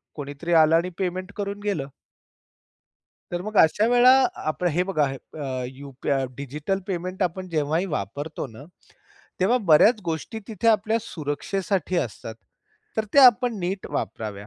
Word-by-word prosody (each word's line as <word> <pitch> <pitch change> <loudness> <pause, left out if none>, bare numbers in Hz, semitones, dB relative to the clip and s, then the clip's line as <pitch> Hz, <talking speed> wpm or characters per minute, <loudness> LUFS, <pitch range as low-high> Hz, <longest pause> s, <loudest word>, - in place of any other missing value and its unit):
कोणीतरी 145 +4 -4
आलं 160 -1 +6
आणि 170 +2 +1
पेमेंट 185 0 -3
करून 200 0 -4
गेलं. 195 -10 -2 1.5
तर 175 0 -2
मग 215 +2 -6
अशा 205 +7 +3
वेळा 245 +1 +6 0.4
आपल 180 +3 -3
हे 180 - +3
बघा. 185 -6 +1
अ, 135 -1 -5
यूपआ 135 0 -3
डिजिटल 150 +8 -3
पेमेंट 185 0 -3
आपण 185 +1 -2
जेव्हाही 160 +2 0
वापरतो 150 -2 -4
ना. 115 +2 -12 0.8
तेव्हा 225 +7 +3
बऱ्याच 210 +9 +6
गोष्टी 165 +7 -4
तिथे 220 0 0
आपल्या 220 +1 +3
सुरक्षेसाठी 185 +2 -3
असतात. 115 -6 -3 0.6
तर 220 - +1
ते - - +6
आपण 245 -2 +6
नीट 190 +2 -3
वापराव्या. 105 -2 -4
175 Hz, 135 wpm, -24 LUFS, 145-200 Hz, 1.5 s, आलं